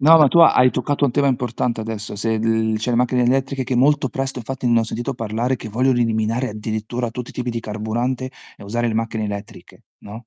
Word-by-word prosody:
No, 160 +4 +7
ma 150 -3 +6
tu 170 - +4
hai 130 -6 +6
toccato 140 +3 0
un - - 0
tema 145 +2 +1
importante 120 -3 -1
adesso. 110 -1 -5
Se 110 +2 0
l 110 0 +1
cioè 115 +3 -2
le 120 - +1
macchine 125 0 +2
elettriche 135 +1 0
che 125 - -2
molto 140 +2 +3
presto 135 -1 -3
infatti 125 +2 -5
ne 115 -1 +4
ho - - 0
sentito 120 +4 -4
parlare, 115 +3 -1
che 110 - -8
vogliono 125 +3 +2
eliminare 115 +1 0
addirittura 110 +3 -4
tutti 125 +1 -7
i - - -14
tipi 125 -1 -4
di 115 0 -3
carburante 120 +5 -3 0.3
e - - -12
usare 120 +4 -1
le 110 - -2
macchine 110 -1 -2
elettriche, 100 0 -8 0.2
no? 110 +3 -10
120 Hz, 220 wpm, -20 LUFS, 110-130 Hz, 0.3 s, No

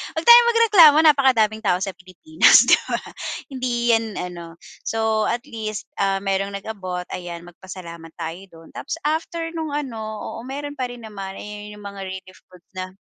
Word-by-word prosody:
huwag 320 - -2
tayong 475 0 +9
magreklamo, 410 -10 +7
napakadaming 250 -8 +3
tao 180 -3 +2
sa 195 - -3
Pilipinas, 185 - +4
'di - - +6
ba. - - 0 0.5
Hindi 240 -2 0
'yan, 225 0 +2
ano. 170 -2 -7 0.3
So 220 -1 0
at 240 +1 -2
least, 215 -2 -5 0.2
ah, 195 -1 +1
merong 195 0 -1
nag-abot, 185 -4 -5
ayan, 175 -1 -6
magpasalamat 170 -2 -11
tayo 165 +2 -5
dun. 165 0 -15
Tapos, 290 - -5
after 330 +2 -2
nung, 320 -2 -4
ano, 265 -7 -4
oo, 215 0 -6
meron 290 +2 -6
pa 255 - -1
rin 240 -2 -11
naman, 195 -3 -7
eh, 210 0 -8
yun 210 0 -11
yung 205 - -13
mga 200 -1 -9
relief 185 0 -9
goods 180 -2 -19
na 185 0 -6
215 Hz, 175 wpm, -22 LUFS, 185-265 Hz, 0.5 s, tayong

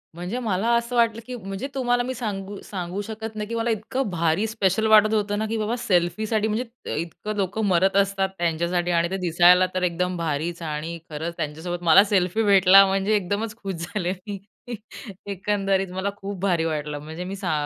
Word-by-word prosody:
म्हणजे 180 +8 -4
मला 220 -2 0
असं 235 +1 -3
वाटलं, 230 -1 +2
की 255 - -6
म्हणजे 195 +2 -5
तुम्हाला 245 -2 +1
मी 255 +1 -3
सांगू, 205 -4 -5
सांगू 185 0 -4
शकत 220 0 -6
नाही, 210 -1 -4
की 230 - -4
मला 230 +1 0
इतकं 225 +3 -2
भारी, 170 +3 +1
स्पेशल 220 -1 +1
वाटत 215 0 +6
होतं 205 -1 0
ना, 220 - 0
की 225 - -1
बाबा 215 +2 -1
सेल्फीसाठी 215 +2 +1
म्हणजे, 230 +2 -4
इतकं 190 +5 -6
लोक 195 0 -2
मरत 190 -2 +2
असतात 195 -1 -1
त्यांच्यासाठी 170 +1 0
आणि 170 0 +2
ते 190 - -1
दिसायला 180 0 +5
तर 185 - 0
एकदम 180 +1 0
भारीच 165 +1 -2
आणि 155 +2 -4
खरंच 160 +2 -4
त्यांच्यासोबत 165 +3 -4
मला 170 +4 +7
सेल्फी 200 +1 +1
भेटला 195 -1 +7
म्हणजे 195 +2 +1
एकदमच 205 +3 -2
खुश 195 -4 -5
झाले 180 +2 -3
मी. 205 -1 -4 0.9
एकंदरीत 195 0 0
मला 190 +2 -1
खूप 195 -1 -6
भारी 175 -4 +1
वाटलं. 150 -2 -3
म्हणजे 160 +4 -7
मी 190 +2 -5
सा 190 -3 -3
195 Hz, 185 wpm, -24 LUFS, 175-215 Hz, 0.9 s, मला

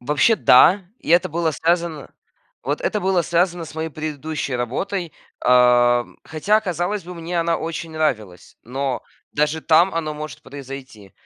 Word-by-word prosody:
Вообще 150 - +3
да, 185 +9 +6 0.2
и - - -7
это 175 +2 +4
было 165 0 0
связано 165 -1 -1 0.5
Вот 145 +2 -2
это 210 - -1
было 190 -2 +2
связано 175 0 0
с 155 - -12
моей 160 0 -3
предыдущей 155 -2 -4
работой. 165 - -3 0.3
Э, 120 -1 +5 0.2
хотя, 205 +8 +1
казалось 180 +1 -2
бы, 180 +1 -8
мне 170 +1 -4
она 165 0 +1
очень 165 0 -5
нравилась, 110 - -3
но 130 +1 -3 0.3
даже 150 +2 0
там 170 +3 +4
оно 155 -2 -2
может 150 0 -8
произойти. 135 -7 -10
155 Hz, 150 wpm, -21 LUFS, 135-170 Hz, 0.5 s, да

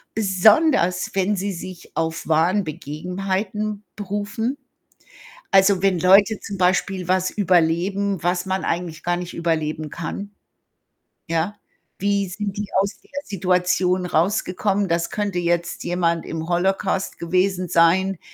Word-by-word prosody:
besonders 205 - +3
wenn 195 +2 +1
sie 200 +2 -2
sich 175 0 -9
auf 160 0 -2
wahren 165 +6 +3
Begebenheiten 190 +7 -3
berufen. 205 +5 -3 0.9
Also, 195 -1 +5
wenn 190 -3 +3
Leute 200 +4 +5
zum 200 - -6
Beispiel 185 0 +1
was 185 0 +2
überleben, 185 +1 +1
was 180 +1 0
man 190 0 -2
eigentlich 170 -2 -3
gar 175 0 0
nicht 175 -1 -6
überleben 155 -2 -2
kann. 175 +6 -6 1.0
Ja. 165 +5 -1 0.4
Wie 200 0 +1
sind 200 +2 -4
die 205 0 -3
aus 200 +1 -1
der - - -25 0.2
Situation 180 -1 +1
rausgekommen? 190 +3 0
Das 170 -1 0
könnte 205 -4 -2
jetzt 170 0 -1
jemand 170 -1 0
im 160 0 -5
Holocaust 190 +2 0
gewesen 185 +2 0
sein. 175 +3 +3
185 Hz, 125 wpm, -22 LUFS, 170-200 Hz, 1.0 s, Also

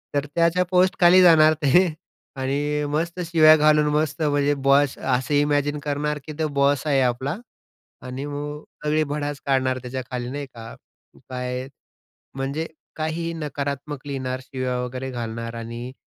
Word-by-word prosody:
तर 145 - +1
त्याच्या 170 +2 +3
पोस्टखाली 185 0 +5
जाणार 155 -3 +7
ते. 160 +7 +5 0.5
आणि 145 +3 -1
मस्त 170 +4 -2
शिव्या 155 -2 +7
घालून 150 0 +4
मस्त 155 +1 0
म्हणजे 145 -1 +2
बॉस 140 0 +4
असं 130 +2 -1
इमॅजिन 145 0 +1
करणार, 150 0 -2
की 155 - -7
तो 155 - +1
बॉस 140 0 +1
आहे 135 -2 +3
आपला. 130 +3 0 0.7
आणि 130 +2 -6
मग 145 +1 -5 0.2
सगळी 155 +1 +2
भडास 145 0 -4
काढणार 130 -1 +1
त्याच्याखाली 125 -1 -5
नाही 145 0 -5
का? 115 0 -9 0.6
काय 125 0 -4 0.7
म्हणजे 140 +4 -2 0.3
काहीही 165 +2 -2
नकारात्मक 145 -1 -5
लिहिणार, 130 -2 -3
शिव्या 130 -1 -3
वगैरे 130 +1 -5
घालणार 115 -1 -5
आणि 115 +2 -6
145 Hz, 140 wpm, -23 LUFS, 130-150 Hz, 0.7 s, जाणार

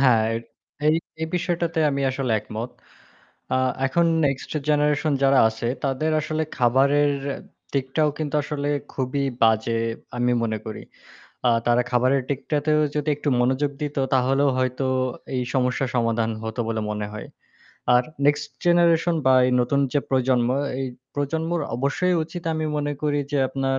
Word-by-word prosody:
হ্যাঁ, 125 -5 +5
এ - - 0 0.5
এই 155 +1 +5 0.2
এই 160 - -1
বিষয়টাতে 170 -2 -1
আমি 140 0 -1
আসলে 130 -3 -1
একমত। 110 +3 -6 0.9
আ - - +3 0.3
এখন 170 +6 +2 0.2
নেক্সট 135 -2 -2 0.2
জেনারেশন 150 +1 +2
যারা 135 0 +5
আছে 110 +1 -4 0.2
তাদের 140 +3 0
আসলে 155 +1 -1
খাবারের 140 +4 +3 0.6
দিকটাও 140 +3 +1
কিন্তু 150 -1 -3
আসলে 145 -1 -3 0.2
খুবই 135 +1 -1 0.2
বাজে 115 0 +3 0.4
আমি 125 0 +2
মনে 110 -1 -1
করি। 110 - -6 0.7
আ - - +6 0.2
তারা 120 +1 +4
খাবারের 130 +2 +2
দিকটাতেও 150 +2 0
যদি 150 0 -2
একটু 145 - -3
মনোযোগ 130 +3 +1
দিত, 145 -1 -3 0.2
তাহলেও 135 +2 +3
হয়তো 130 +1 0 0.5
এই 125 - 0
সমস্যার 125 0 +1
সমাধান 115 -1 +1
হতো 110 +1 -4
বলে 110 -1 -1
মনে 105 -1 -3
হয়। 105 - -7 0.7
আর 125 - +5 0.2
নেক্সট 145 0 +1
জেনারেশন 170 -1 +4
বা 130 - +6
এই 125 - +1
নতুন 140 +3 +1
যে 145 - +2
প্রজন্ম, 130 -2 +2 0.3
এই 135 - -1 0.3
প্রজন্মর 160 +4 -1 0.2
অবশ্যই 145 +8 +1
উচিত 170 +2 -8
আমি 155 - -2
মনে 145 0 -1
করি 145 -1 +1
যে 145 - +2
আপনার 135 0 -1
135 Hz, 150 wpm, -23 LUFS, 125-150 Hz, 0.9 s, আ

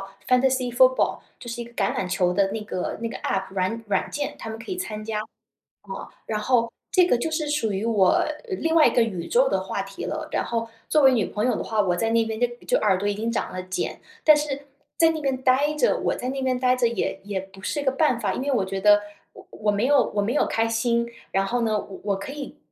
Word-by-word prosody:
是 195 0 -9 0.4
fantacy 255 -1 -1
football， 255 +1 +4 0.2
就 240 - -9
是 235 +1 -4
一 235 - -4
个 235 - -14
橄 205 -5 0
榄 185 - -2
球 180 -1 +1
的 195 +1 +1
那 220 - -3
个 205 -4 -4
那 230 - -2
个 - - -6
APP 190 0 -2
软 195 +4 -1
软 205 - 0
件 290 0 -4
他 225 - -7
们 220 - -5
可 230 - -10
以 370 - -2
参 215 -12 -5
加。 215 -1 -2 0.7
呃， - - -7 0.2
然 215 -1 -2
后， 230 0 +2 0.2
这 370 -1 +5
个 245 - +3
就 320 - -2
是 310 -1 -1
属 245 -8 0
于 195 +2 -2
我 205 -5 +3 0.2
另 330 -5 -1
外 320 - +7
一 - - +5
个 240 - +5
宇 190 -7 -3
宙 - - +3
的 - - +1
话 - - -3
题 - - -7
了。 - - -4
然 - - +1
后 230 -1 -2 0.2
作 305 -2 +4
为 265 -1 +7
女 225 -5 +2
朋 210 - -2
友 250 - +2
的 - - -3
话， 220 - -3
我 185 -4 +3
在 225 +6 0
那 230 0 +3
边 220 +1 -4
就 245 - +4 0.2
就 - - +3
耳 190 -2 +3
朵 200 +2 -3
已 205 - +1
经 225 +3 -2
长 230 - -2
了 185 0 -4
茧， 185 0 -3 0.2
但 305 - +8
是 290 -2 -2 0.3
在 325 -1 +5
那 320 -1 -3
边 270 -3 0
呆 275 +4 +3
着 395 - +2
我 - - 0
在 250 +1 -3
那 270 0 -3
边 255 -1 0
呆 250 0 +3
着 245 -2 +2
也 235 - -2
也 200 -1 -3
不 195 +1 -10
是 290 +9 -2
个 265 - +2
办 270 -4 +2
法， - - -1
因 - - -3
为 285 - 0
我 235 -8 +2
觉 195 0 -4
得 205 0 +6 0.3
我 - - -14
我 210 -1 -1
没 205 +3 0
有 280 -1 +3
我 205 - +1
没 215 +4 0
有 295 - +2
开 225 0 +1
心， 235 +1 +1 0.3
然 195 0 +2
后 240 +5 -1
呢， 220 -2 +1
我 195 -1 -8
我 200 -1 0
可 200 +8 -7
以 285 -1 -7
230 Hz, 325 characters per minute, -24 LUFS, 205-265 Hz, 0.7 s, 但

